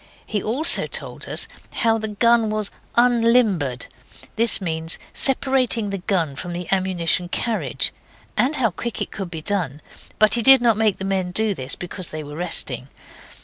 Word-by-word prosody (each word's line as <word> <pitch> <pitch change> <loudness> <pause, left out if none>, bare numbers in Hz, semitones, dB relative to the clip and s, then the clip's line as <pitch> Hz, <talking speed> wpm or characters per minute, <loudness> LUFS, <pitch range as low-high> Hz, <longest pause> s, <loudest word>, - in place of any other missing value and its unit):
He 210 -2 -3
also 260 - +4
told - - -4
us - - 0 0.3
how 225 -1 +1
the 220 - +1
gun 230 +1 +2
was 215 -1 -2 0.2
unlimbered 230 - +2 0.5
(this 230 0 +5
means 165 -3 -3 0.2
separating 260 -5 +1
the 195 - -3
gun 175 -6 -1
from 175 +5 -6
the 175 0 -6
ammunition 180 -2 0
carriage), 225 +4 -2 0.4
and 275 +5 +1
how 235 -7 +1
quick 235 +6 -5
it - - -4
could 195 -4 -6
be 160 -2 -7
done 175 -8 -2 0.4
but 215 0 +4
he 240 - +2
did 270 +3 +8
not 235 -2 +3
make 215 -2 +1
the 190 - -4
men 190 -2 -1
do 215 +3 +2
this 130 -6 -6
then, - - -28
because 180 0 -3
they 155 0 -7
were 145 0 -9
resting. 145 -7 -1
200 Hz, 175 wpm, -21 LUFS, 175-230 Hz, 0.5 s, did